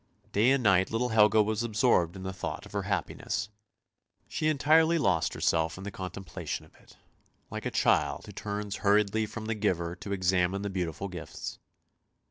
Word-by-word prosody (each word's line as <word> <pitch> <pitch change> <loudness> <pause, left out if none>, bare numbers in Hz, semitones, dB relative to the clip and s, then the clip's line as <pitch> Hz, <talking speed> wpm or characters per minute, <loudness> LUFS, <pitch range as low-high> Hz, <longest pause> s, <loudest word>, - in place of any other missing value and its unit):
Day 110 +5 +4
and 135 -1 +3
night 95 -3 +4
little 120 +2 0
Helga 110 -1 +5
was 110 +1 -1
absorbed 110 -6 +2
in 95 - -8
the 95 0 -4
thought 90 - -5
of - - -13
her - - -1
happiness; 105 - -2 0.8
she 155 - -1
entirely 160 +3 +4
lost 90 - +1
herself 80 +1 +1
in 95 - -8
the 100 - -5
contemplation 90 -4 -6
of - - -23
it, - - -21 0.5
like - - -4
a - - 0
child - - +1
who - - -9
turns 105 -1 -4
hurriedly 105 +1 +2
from 110 0 -7
the 115 - -1
giver 90 -5 -1
to 90 +3 -7
examine 95 0 +1
the 100 - -3
beautiful 90 0 -3
gifts. 90 -5 -7
100 Hz, 175 wpm, -29 LUFS, 90-110 Hz, 0.8 s, Helga